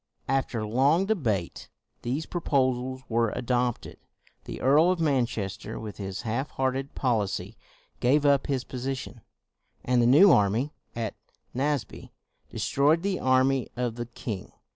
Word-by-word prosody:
After 130 -4 -1
long 140 - +3
debate, 115 - -2 0.3
these 135 +7 -2
proposals 130 -5 -1
were 115 0 +1
adopted: 125 -1 -1 0.5
the - - -6
Earl 150 +6 +5
of 185 -1 +1
Manchester 120 - -1
with 110 -2 -7
his 95 -2 -5
half 120 +6 -2
hearted 135 +1 -2
policy 110 -7 -1 0.4
gave 140 +4 +3
up 140 -1 +3
his 135 -3 -1
position; 125 -4 -5 0.6
and 125 -1 +3
the 120 - +4
new 165 +10 +7
army, 110 +8 +2 0.2
at 115 -2 -3 0.4
Naseby, 135 -3 -2 0.4
destroyed 150 +5 +1
the 195 -2 -1
army 130 0 +2
of 125 -2 -1
the 120 0 -5
king. 110 -4 -6
130 Hz, 130 wpm, -27 LUFS, 115-140 Hz, 0.6 s, new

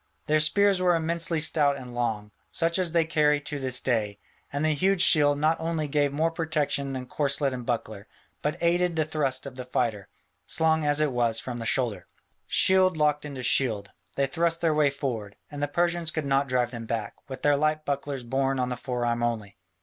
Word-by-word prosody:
Their 155 0 +2
spears 195 +5 +3
were 180 -1 +3
immensely 165 0 -1
stout 145 -2 +3
and 125 -2 -9
long, 110 -4 -2 0.2
such 170 +2 +1
as 180 -3 0
they 165 -1 +2
carry 150 -2 +2
to 145 0 -4
this 130 -2 +1
day, 110 -5 -1 0.3
and 145 +2 -1
the 155 - +3
huge 185 +4 +2
shield 145 -5 +5
not 155 +2 +1
only 160 -2 -2
gave 145 0 +1
more 160 +3 0
protection 150 -4 -1
than 130 -1 -5
corslet 140 0 0
and 125 -2 -6
buckler, 110 -4 -3 0.3
but 150 - -2
aided 175 0 +2
the 155 -1 +1
thrust 140 -4 -2
of 140 - -7
the 130 0 -6
fighter, 115 -5 -2 0.4
slung 160 -1 +1
as 145 +1 +3
it 150 -2 +1
was 120 -2 +2
from 120 0 -5
the 115 - -3
shoulder. 110 -9 0 0.4
Shield 185 -2 +3
locked 150 -1 +1
into 140 -3 -6
shield, 110 -6 0 0.2
they 140 - +2
thrust 165 +3 0
their 165 -2 +2
way 150 -1 +3
forward; 115 -7 -4 0.2
and 145 0 -6
the 145 - +1
Persians 170 +2 0
could 155 -2 -3
not 140 0 +1
drive 125 -1 +1
them 115 -2 -7
back, 110 -3 -3 0.2
with 130 -1 -8
their 145 -1 +4
light 155 +1 0
bucklers 140 -2 -3
borne 135 +2 0
on 125 0 0
the 125 - -3
forearm 120 -1 -2
only. 110 -4 -2
145 Hz, 205 wpm, -26 LUFS, 125-160 Hz, 0.4 s, shield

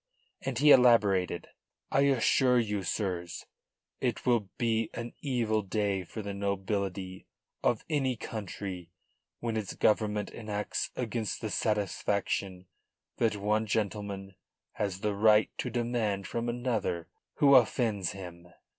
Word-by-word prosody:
And 135 -3 -3
he 150 +3 +6
elaborated: 105 -9 +4 0.4
"I 140 - +4
assure 130 -1 +4
you, 105 -4 0
sirs, 90 -1 -3 0.5
it - - -2
will 115 -6 +2
be 115 -2 +1
an 120 0 -5
evil 115 -6 0
day 100 -1 -1
for 110 +5 -7
the 100 0 -4
nobility 100 -1 -3 0.4
of 120 - +1
any 135 -5 +1
country 95 -5 -6 0.5
when 115 -1 -2
its 110 -3 -3
Government 105 -1 +1
enacts 105 -2 -3
against 115 -3 -2
the 110 - -4
satisfaction 100 -3 -1 0.5
that 110 -2 +2
one 105 +2 0
gentleman 100 -2 -2 0.4
has 100 -2 -3
the 105 -1 0
right 105 +1 +4
to 125 - -1
demand 115 -5 -1
from 120 +4 -2
another 115 -8 -1 0.3
who 140 -1 +5
offends 110 -6 +3
him." 90 -3 -9
105 Hz, 125 wpm, -30 LUFS, 100-120 Hz, 0.5 s, he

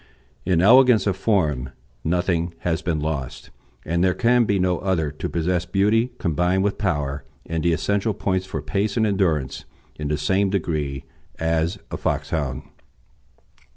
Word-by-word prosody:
In 90 -3 +3
elegance 125 +1 +6
of 100 -3 +1
form 80 - 0 0.3
nothing 85 0 0
has 85 0 -1
been 85 -4 -1
lost, 75 -4 -4 0.3
and 85 +2 0
there 90 -1 +2
can 120 0 +3
be 100 -2 +1
no 90 -2 +1
other 85 -6 0
to 75 - -5
possess 90 +1 -1
beauty 105 +6 +2
combined 90 +3 +1
with 100 0 -1
power 75 -8 -1 0.2
and 80 0 -2
the 85 - +3
essential 100 +5 0
points 95 -2 -1
for - - -4
pace 100 +3 -1
and 110 - +3
endurance 85 -10 0 0.3
in 75 - -3
the 75 0 0
same 95 +6 +1
degree 75 -8 -2 0.3
as 80 +1 0
a - - -3
Foxhound. 70 -5 -2
90 Hz, 155 wpm, -23 LUFS, 80-100 Hz, 0.3 s, elegance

